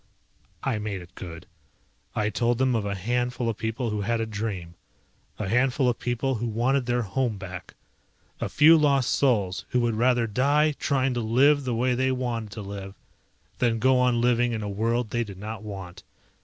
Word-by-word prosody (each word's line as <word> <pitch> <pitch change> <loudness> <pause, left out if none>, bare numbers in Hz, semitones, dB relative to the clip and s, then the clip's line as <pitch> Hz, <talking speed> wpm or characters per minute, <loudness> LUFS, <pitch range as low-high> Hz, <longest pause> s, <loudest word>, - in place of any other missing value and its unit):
I 125 -6 0
made 100 -3 -4
it 90 +1 -18
good. 85 -3 -9 0.7
I 105 0 0
told 120 +1 +1
them 130 0 +2
of 110 -3 0
a 100 - -2
handful 120 +4 -1
of 110 - -3
people 115 +1 -2
who 105 -1 -2
had 115 +3 0
a 115 - 0
dream. 105 -6 -4 0.6
A 105 - -3
handful 125 +4 +2
of 120 - 0
people 120 +2 -1
who 120 0 -2
wanted 125 +4 +1
their 120 0 +1
home 115 +1 -1
back. 95 -2 -8 0.6
A - - -2
few 160 +2 +7
lost 140 -4 +3
souls 100 -9 +1
who 125 - +1
would 120 -1 +1
rather 120 +1 +2
die 140 +7 +2
trying 135 -2 0
to 120 - -1
live 135 +6 +3
the 125 -2 -1
way 125 +2 +1
they 130 +1 +1
wanted 120 -4 -2
to 105 - -6
live 100 0 -7 0.6
than 120 -2 +2
go 130 +2 +3
on 125 -2 +3
living 120 0 +2
in 110 -2 -3
a - - -3
world 115 +2 -1
they 120 0 0
did 100 -4 -9
not 110 +2 -6
want. 95 -3 -8
115 Hz, 195 wpm, -26 LUFS, 105-125 Hz, 0.7 s, few